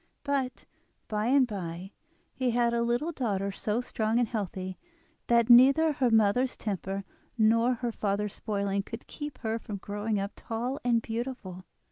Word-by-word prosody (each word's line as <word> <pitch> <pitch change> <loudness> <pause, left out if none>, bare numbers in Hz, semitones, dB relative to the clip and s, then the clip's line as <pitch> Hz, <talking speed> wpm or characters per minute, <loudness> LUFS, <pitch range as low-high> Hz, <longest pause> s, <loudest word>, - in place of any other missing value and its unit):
But, 275 -3 -2 0.4
by 215 +1 -1
and 265 +1 +5
by, 185 -4 -6 0.4
he 255 -1 0
had 235 0 +2
a 235 - +1
little 240 +8 0
daughter 200 - -1
so 215 +4 -1
strong 220 -2 -1
and 240 -1 +3
healthy 190 -4 -4 0.5
that 235 -1 +4
neither 270 +6 +7
her 260 -3 +2
mother's 225 +3 +3
temper 195 -1 -3 0.3
nor 230 +3 +4
her 240 0 -2
father's 205 -1 -1
spoiling 200 -2 -1
could 225 +3 -8
keep 295 -3 -7
her 225 0 -1
from 210 -2 -6
growing 205 +2 -2
up 200 +1 -3
tall 240 +4 -3
and 235 -2 +2
beautiful. 225 -6 -5
225 Hz, 155 wpm, -29 LUFS, 200-245 Hz, 0.5 s, neither